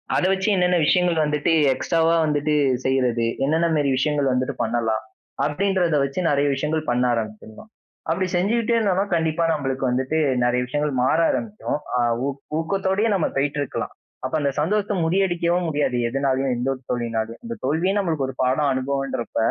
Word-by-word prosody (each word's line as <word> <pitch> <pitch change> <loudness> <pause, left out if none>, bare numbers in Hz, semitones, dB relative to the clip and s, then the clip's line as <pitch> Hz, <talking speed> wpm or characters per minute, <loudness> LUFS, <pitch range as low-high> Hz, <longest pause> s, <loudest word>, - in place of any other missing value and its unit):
அத - - +2
வச்சு 195 +2 0
என்னென்ன 180 0 +2
விஷயங்கள் 180 -2 +3
வந்துட்டு 150 +2 0 0.2
எக்ஸ்ட்ராவா 165 +5 +1
வந்துட்டு 150 0 0 0.3
செய்றது. 125 -3 +1 0.2
என்னென்ன 160 +3 +2
மாரி 145 -2 +1
விஷயங்கள் 145 0 +1
வந்துட்டு 130 +2 -1
பண்ணலாம். 115 -1 0 0.4
அப்பிடின்றத 175 +1 +1
வச்சு 140 +5 -3
நிறைய 145 0 +2
விஷயங்கள் 155 +3 -1
பண்ண 120 +1 +1
ஆரம்பிச்சிர்லாம். 110 - -6 0.4
அப்படி 185 +3 +1
செஞ்சுகிட்டே 230 +6 +1
இருந்தோன்னா, 200 -3 +1
கண்டிப்பா 160 0 0
நம்மளுக்கு 135 -3 -2
வந்துட்டு 130 +5 0 0.3
நிறைய 125 0 +2
விஷயங்கள் 145 +2 -1
மாற 130 +6 +2
ஆரம்பிக்கும். 210 -8 -3 0.2
அ, - - +1 0.3
ஊக் 140 0 -4 0.2
ஊக்கத்தோடயே 195 +5 0
நம்ம 185 - +1
போயிட்டு 145 +1 0
இருக்கலாம். 140 - -4 0.3
அப்ப 130 - -4
அந்த 140 -1 +1
சந்தோஷத்த 205 +4 0
முறியடிக்கவும் 175 -1 +1
முடியாது 145 -4 0
எதுனாலயும், 135 0 0
எந்த 125 +3 -1
ஒரு 130 - -16
தோல்வியினாலயும். 115 - -3
அந்த 235 0 -5
தோல்வியே 165 +8 +1
நம்மளுக்கு 160 -8 -1
ஒரு 130 - -8
பாடம் 135 +2 +2
அனுபவம்ன்றப்ப, 135 -3 -3
150 Hz, 155 wpm, -22 LUFS, 130-180 Hz, 0.4 s, விஷயங்கள்